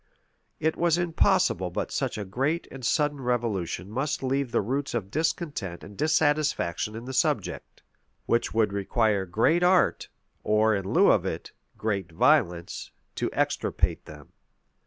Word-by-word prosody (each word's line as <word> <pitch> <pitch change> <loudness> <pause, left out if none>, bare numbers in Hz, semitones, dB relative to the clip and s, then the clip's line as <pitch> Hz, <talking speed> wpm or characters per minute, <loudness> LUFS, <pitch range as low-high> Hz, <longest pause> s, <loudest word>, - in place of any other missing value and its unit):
[] - - -46
It 160 +1 +1
was 170 -1 +2
impossible 175 - +2
but 85 - -4
such - - -2
a 105 - -4
great 135 - -1
and 135 -1 -9
sudden 145 +2 +1
revolution 115 -8 -2
must 135 +5 -2
leave 135 -1 0
the - - +2
roots 135 +5 -2
of 100 -4 -3
discontent 150 - -2
and 100 - -11
dissatisfaction 145 - +1
in 115 +2 -7
the 130 - -6
subject, 130 - -1 0.4
which 115 - +1
would 110 -3 +1
require 100 0 +1
great 115 - +2
art, 180 0 +3 0.3
or, 110 +1 +3
in 100 -1 -2
lieu - - +5
of - - +3
it, - - -5 0.3
great 100 -5 -2
violence, 90 - +1 0.2
to - - -2
extirpate - - -1
them. 75 -2 -12
120 Hz, 150 wpm, -27 LUFS, 100-150 Hz, 0.4 s, lieu